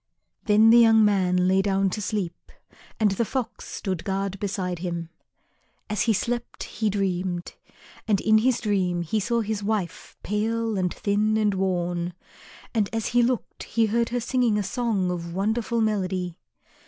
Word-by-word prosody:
Then 220 +1 +6
the 235 - +8
young 225 -2 +6
man 180 -3 +2
lay 190 +1 +4
down 195 -1 +1
to 210 - -3
sleep 195 -3 -4 0.5
and 215 -2 +3
the 195 +4 0
Fox 245 +1 -4
stood 185 -5 -4
guard 195 0 -2
beside 185 -3 -3
him. 170 -2 -4 0.8
As 215 - 0
he 225 - +3
slept 240 +4 -3
he 220 -1 -2
dreamed. 185 -3 -2 0.5
And 205 -3 +3
in 220 +1 +4
his 245 +1 +2
dream 185 -5 0
he 215 +6 -1
saw 235 +3 0
his 215 -1 -3
wife 200 -5 -3
pale 225 +2 -1
and 180 -2 0
thin 210 +1 +1
and 210 -2 +2
worn, 175 -2 -1 0.6
and 215 -4 +1
as 225 -1 -2
he 245 0 +3
looked 245 0 -1
he 230 0 +1
heard 230 +2 +1
her 245 - -1
singing 240 -2 +1
a 205 - 0
song 200 -3 -1
of 170 -1 -5
wonderful 225 +4 0
melody. 185 -5 -1
205 Hz, 165 wpm, -25 LUFS, 185-225 Hz, 0.8 s, the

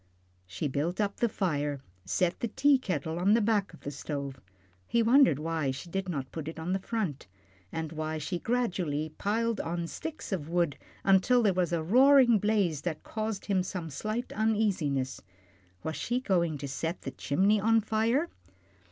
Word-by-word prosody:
She 95 +11 -3
built 150 +7 -2
up 200 -1 0
the 235 - +2
fire, 150 -8 -1 0.3
set 170 - 0
the 235 - -1
teakettle 205 - +1
on 200 +4 +4
the - - +4
back 205 -2 +1
of 165 - -15
the 145 - -5
stove 140 -3 -5 0.5
he 235 -1 +2
wondered 245 - +5
why 160 -2 -1
she 140 +6 -6
did 190 0 -2
not 135 -6 -4
put 160 -2 -6
it 160 - -6
on 165 +3 -2
the 195 - 0
front, 190 - -3 0.4
and 160 -1 -4
why 155 0 -3
she 155 +3 -3
gradually 180 -11 -1
piled 225 +2 0
on 170 +1 -3
sticks 315 - -6
of 160 -6 -3
wood 170 -4 +1 0.3
until 200 +6 +4
there 200 -3 +4
was 180 -2 0
a 165 -2 0
roaring 250 - +6
blaze 195 -8 +1
that 160 -2 -4
caused 215 -2 -4
him 195 -3 +2
some 180 -3 -5
slight 215 - -3
uneasiness. 195 -12 0 0.6
Was 160 - -3
she 245 +1 -1
going 170 - +1
to 140 0 -5
set 160 +6 -3
the 135 - -4
chimney 195 +13 +2
on 225 +2 +4
fire? 225 +8 +1
180 Hz, 175 wpm, -29 LUFS, 155-220 Hz, 0.6 s, roaring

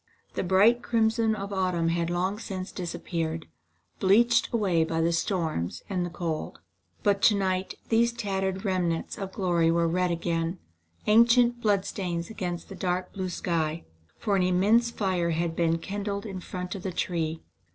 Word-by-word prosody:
The - - -1
bright 200 +6 +4
crimson 225 -1 +2
of 200 -1 -5
autumn 180 -3 +1
had 170 0 0
long 185 +4 -1
since 190 -4 -5
disappeared, 165 -2 -3 0.5
bleached 230 +5 +4
away 190 -8 +2
by 165 0 -1
the 165 +1 +2
storms 165 - -1
and 180 -2 0
the 175 - -3
cold. 165 -2 -4 0.4
But 200 -1 +2
to 210 - +6
night 190 -1 -1
these 235 +1 +3
tattered 195 -3 -2
remnants 180 -4 -1
of 195 -1 -4
glory 175 -4 +2
were 170 0 +2
red 180 +2 +1
again: 170 0 -1 0.5
ancient 235 +2 +5
bloodstains 190 -4 -1
against 175 -5 -4
the - - -9
dark 180 0 -2
blue 190 -2 -3
sky. 165 -2 -2 0.3
For 205 - 0
an 190 - +3
immense 200 +6 +3
fire 185 -6 0
had 165 0 -1
been 165 -1 +2
kindled 200 +3 -4
in 195 -3 -5
front 180 0 -5
of 195 - -6
the 190 - -3
tree. 165 -2 -2
185 Hz, 160 wpm, -27 LUFS, 170-205 Hz, 0.5 s, to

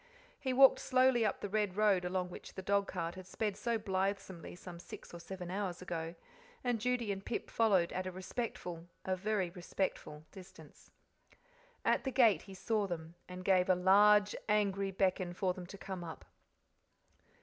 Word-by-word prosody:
He 265 - -1
walked 265 +1 +7
slowly 255 -2 +3
up 210 - 0
the - - -2
red 205 -2 -1
road 205 -4 +4
along 180 0 -1
which - - -10
the 190 - -6
dogcart 190 -4 0
had 185 0 -10
sped 205 +1 -2
so 235 -1 0
blithesomely 195 -3 -2
some 175 -1 -10
six 175 - -11
or 170 - -7
seven 180 0 -7
hours 190 -2 -2
ago, 170 -2 -4 0.5
and 245 -3 0
Judy 245 -3 0
and 195 0 -4
Pip 230 - -4
followed 195 -7 +3
at 185 0 -2
a - - -3
respectful 180 -3 -5 0.2
a 185 - +1
very 190 -2 -1
respectful 175 -4 -3
distance. 190 -1 -14 1.0
At - - +3
the 265 - -1
gate 230 - +5
he 195 -1 -11
saw 210 +1 0
them, 165 -2 -5 0.2
and 180 0 -8
gave 185 -1 +4
a 185 - +6
large, 205 +3 +5
angry 200 -2 +2
beckon 185 -2 0
for 185 0 0
them 180 -1 -8
to 200 - -9
come 190 -1 -6
up. 165 - -8
190 Hz, 170 wpm, -34 LUFS, 180-210 Hz, 1.0 s, walked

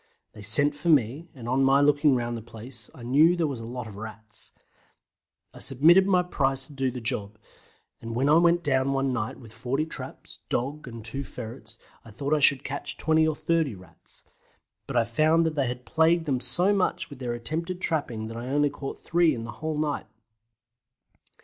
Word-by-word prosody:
They 105 - -12
sent 145 +8 +2
for 170 +4 -3
me, 145 +2 +2
and 120 -3 -9
on 130 +2 +2
my 135 +1 +5
looking 145 -1 +4
round 120 -1 -2
the 115 - -6
place 115 +1 -6
I 120 - -11
knew 150 +8 +4
there 170 -2 0
was 140 -5 -3
a 115 - -7
lot 125 0 -6
of 105 -3 -10
Rats. 110 0 -11 1.0
I - - -12
submitted 170 +9 +5
my 180 -2 +3
price 135 -6 0
to 145 - -13
do 135 -1 -1
the 125 0 -6
job, 110 -3 -4 0.6
and 115 0 -6
when 130 +3 +1
I 150 - +5
went 170 0 +3
down 135 -2 +1
one 135 -1 0
night 110 -3 -3
with 115 -4 -14
40 130 +6 -2
traps, 160 - -8
dog, 140 +4 -3
and 115 -2 -9
two 135 +4 -5
ferrets 115 -2 -9 0.3
I - - -14
thought 140 +7 -3
I 155 - +3
should 140 -1 +4
catch 140 +1 -6
20 160 0 +2
or 155 - 0
30 160 -7 0
Rats, 90 -3 -19 0.6
but - - -2
I 120 - +4
found 155 +8 +2
that 160 - 0
they 140 -4 0
had 125 +1 -5
plagued 160 +1 +2
them 135 -4 0
so 175 +11 +5
much 180 -4 -1
with 140 - -10
their 125 -2 -3
attempted 160 +10 -3
trapping 140 -11 -1
that 115 +1 -7
I 120 +2 -6
only 145 +1 +2
caught 140 -1 -6
three 170 -3 +2
in 115 - -6
the 115 - -6
whole 155 -1 -2
night. 150 -1 -2
135 Hz, 205 wpm, -26 LUFS, 120-155 Hz, 1.0 s, my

